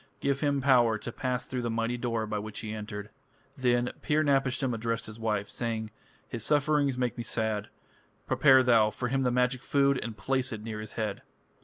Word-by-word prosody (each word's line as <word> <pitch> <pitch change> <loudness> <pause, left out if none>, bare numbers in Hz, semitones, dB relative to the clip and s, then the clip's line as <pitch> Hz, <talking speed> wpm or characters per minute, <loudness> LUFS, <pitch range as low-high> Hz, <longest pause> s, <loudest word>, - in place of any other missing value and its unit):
Give 140 0 0
him 140 -2 +1
power 120 -5 +5
to 120 - -6
pass 125 +1 -2
through 125 -1 -3
the 120 - -2
mighty 115 +1 -1
door 115 -2 -1
by 105 -1 -2
which 105 0 -6
he 110 -1 -5
entered." 105 -1 -6 0.4
Then 125 -1 +1
Pir 155 +1 +2
napishtim 135 -2 +1
addressed 115 0 -2
his 110 +1 -7
wife, 105 -3 -1
saying: 110 -2 -3 0.4
"His 115 -3 -5
sufferings 145 -1 +2
make 125 -2 -1
me - - -2
sad. 110 -2 -1 0.6
Prepare 135 -3 +5
thou 115 -4 +5
for 120 +4 -3
him 135 +1 +1
the 125 - +2
magic 125 +1 +1
food, 140 -2 +2
and 115 -2 -5
place 130 +6 -1
it 110 -2 -6
near 110 -1 -5
his 110 -1 -7
head." 105 -3 -3
120 Hz, 195 wpm, -29 LUFS, 110-130 Hz, 0.6 s, power